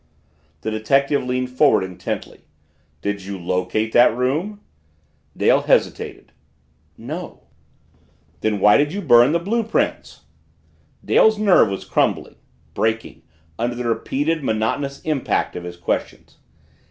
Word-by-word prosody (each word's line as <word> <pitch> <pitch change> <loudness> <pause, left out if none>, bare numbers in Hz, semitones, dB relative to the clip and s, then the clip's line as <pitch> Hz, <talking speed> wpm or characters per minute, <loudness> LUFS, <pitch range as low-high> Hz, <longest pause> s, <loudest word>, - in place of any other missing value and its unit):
The 110 - -3
detective 135 +6 +1
leaned 125 0 -2
forward 130 -5 +3
intently. 95 -1 -6 0.6
"Did 100 -1 -3
you 100 0 -6
locate 95 +5 -2
that 120 -1 +5
room?" 155 +12 -1 0.8
Dale - - +3
hesitated. - - -1 0.7
"No." 155 +10 -8 1.0
"Then 110 -2 -1
why 105 +2 +6
did 145 +1 +1
you 200 +2 -5
burn 120 -2 +6
the 170 - +2
blue 205 +8 -1
prints?" 225 0 -2 0.8
Dale's 220 -1 +4
nerve 195 - +4
was 95 - -5
crumbling - - -1 0.4
breaking 110 +1 -2 0.4
under 120 +1 -1
the 120 0 -4
repeated, 145 +7 -1
monotonous 130 +5 -2
impact 150 -4 -1
of 90 - -6
his 90 0 -8
questions. 85 - -4
125 Hz, 120 wpm, -21 LUFS, 110-150 Hz, 1.0 s, why